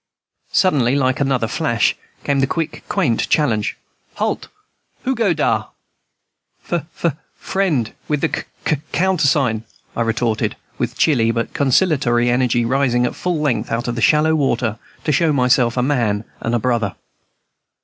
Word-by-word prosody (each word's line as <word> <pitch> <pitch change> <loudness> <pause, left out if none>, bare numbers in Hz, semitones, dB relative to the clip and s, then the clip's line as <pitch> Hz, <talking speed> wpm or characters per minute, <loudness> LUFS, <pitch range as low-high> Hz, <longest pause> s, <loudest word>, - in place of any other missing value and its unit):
Suddenly, 140 -9 +3
like 130 -2 +1
another 135 -4 +1
flash, 120 -2 +1 0.3
came 140 -1 +1
the 135 - +2
quick, 160 +2 -3
quaint 150 - +1
challenge, 110 -9 +1 0.4
"Halt! - - -2 0.6
Who's 265 - +1
go 225 -6 +1
dar?" 155 -3 0 1.0
"F 165 -3 -1 0.2
f 160 -5 +2 0.2
friend 155 - -1
with 150 -2 0
the - - +2
c - - -3 0.3
c 155 - +2 0.2
countersign," 145 -11 +2 0.3
retorted 115 -1 0
I, - - -33 0.2
with - - -2
chilly, 125 -8 +3
but 115 0 -2
conciliatory 130 -5 +2
energy, 120 -1 +2
rising 125 -1 +2
at - - -2
full 175 -4 -2
length 145 -5 0
out 115 +2 -1
of 120 - -1
the 120 - -4
shallow 155 +4 +4
water, 125 -7 0 0.2
to 155 - +1
show 160 +2 +3
myself 125 -3 +2
a 125 - +2
man 115 -7 +1 0.2
and 115 +1 -1
a - - +2
brother. 115 -4 0
130 Hz, 150 wpm, -19 LUFS, 120-155 Hz, 1.0 s, shallow